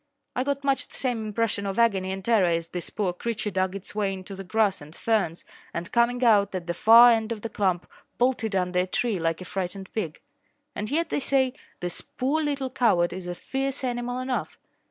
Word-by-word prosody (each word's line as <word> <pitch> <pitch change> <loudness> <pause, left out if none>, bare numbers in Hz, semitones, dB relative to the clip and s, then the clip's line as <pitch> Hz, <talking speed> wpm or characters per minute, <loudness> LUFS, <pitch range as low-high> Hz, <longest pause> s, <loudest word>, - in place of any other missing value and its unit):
I 255 - +1
got 280 0 -2
much 275 -1 +1
the - - -17
same 240 -4 -1
impression 210 -2 -1
of 195 - -3
agony 195 -5 +2
and 190 0 -5
terror 215 -7 +4
as 165 0 -1
this 175 -1 -5
poor 195 -4 -1
creature 215 +2 -3
dug 185 0 0
its 195 - -8
way 205 -2 0
into 190 +1 -7
the 195 - -7
grass 205 -1 +1
and 150 +3 -12
ferns 205 -7 0 0.3
and, 170 +3 -4
coming 245 +1 +2
out 205 -4 +4
at 180 -2 -3
the 170 - -2
far 230 +5 +8
end 225 0 +1
of 220 -2 -3
the 230 - -4
clump, 190 -5 0 0.3
bolted 240 -4 +1
under 180 -1 +1
a 180 - +1
tree 230 0 0
like 165 +1 -1
a - - -6
frightened 190 0 -5
pig. 170 -9 -3 0.5
And 210 - -4
yet, 325 +4 0
they - - 0
say, 265 -2 +2 0.3
this 175 -1 -4
poor 280 +5 -1
little 280 -3 -2
coward 175 -8 +2
is 185 -1 -6
a 175 - -3
fierce 270 +6 -3
animal 245 0 -2
enough. 255 0 -3
210 Hz, 215 wpm, -26 LUFS, 185-245 Hz, 0.5 s, far